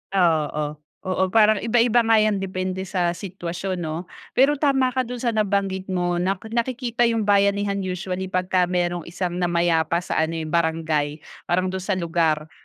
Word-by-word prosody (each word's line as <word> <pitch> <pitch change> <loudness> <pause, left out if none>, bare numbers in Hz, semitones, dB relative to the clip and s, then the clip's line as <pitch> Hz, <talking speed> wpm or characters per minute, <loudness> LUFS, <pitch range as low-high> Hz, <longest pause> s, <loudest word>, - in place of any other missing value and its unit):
Oo. 150 -4 +1 0.3
Oo, 185 0 0
parang 215 -1 +5
iba-iba 235 0 +3
nga 225 -1 +4
yan 210 -2 +1
depende 185 0 -3
sa 175 -2 -1
sitwasyon, 185 -1 -5
'no? 160 +1 -4 0.3
Pero 275 +3 +4
tama 270 -3 +2
ka 255 -1 -1
dun 250 - -5
sa 240 -1 -1
nabanggit 200 -3 -1
mo 175 -2 0
na 190 +2 +1 0.2
nakikita 240 0 0
yung 225 -2 0
bayanihan 200 0 +2
usually 185 0 -3
pagka 185 -1 +1
merong 175 -2 -1
isang 175 +1 -3
namayapa 170 -1 +1
sa - - -1
ano 160 +1 0
eh, 160 - -3
barangay, 160 -2 -1 0.2
parang 185 +1 +1
dun 190 - -3
sa 190 +1 -1
lugar, 165 -3 0
185 Hz, 160 wpm, -23 LUFS, 170-210 Hz, 0.3 s, parang